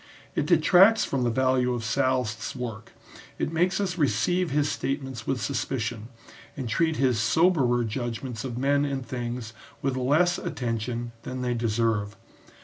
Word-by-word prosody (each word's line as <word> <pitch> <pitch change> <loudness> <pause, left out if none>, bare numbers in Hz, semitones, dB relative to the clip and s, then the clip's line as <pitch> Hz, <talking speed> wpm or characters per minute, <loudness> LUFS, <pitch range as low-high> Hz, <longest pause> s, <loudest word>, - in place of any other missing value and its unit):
It - - -1
detracts 195 +5 +6
from 135 - -1
the 120 - +2
value 125 0 +2
of 120 - -4
Sallust's 125 -1 0
work, 115 -4 -6 0.4
it 155 - -2
makes 180 +4 +2
us 185 -3 -2
receive 160 - +1
his 145 +1 +1
statements 135 -5 -3
with 135 -2 0
suspicion, 110 -1 -3 0.5
and 130 -3 -3
treat 160 +8 +1
his 130 -5 +2
soberer 125 -1 +3
judgments 120 +1 -4
of 125 -3 -5
men 140 +2 +2
and 135 -3 -2
things 120 -3 -5 0.3
with 135 -1 0
less 150 +8 +2
attention 120 0 -3
than 125 +2 -5
they 125 -1 0
deserve. 110 -3 0
125 Hz, 145 wpm, -26 LUFS, 115-140 Hz, 0.5 s, detracts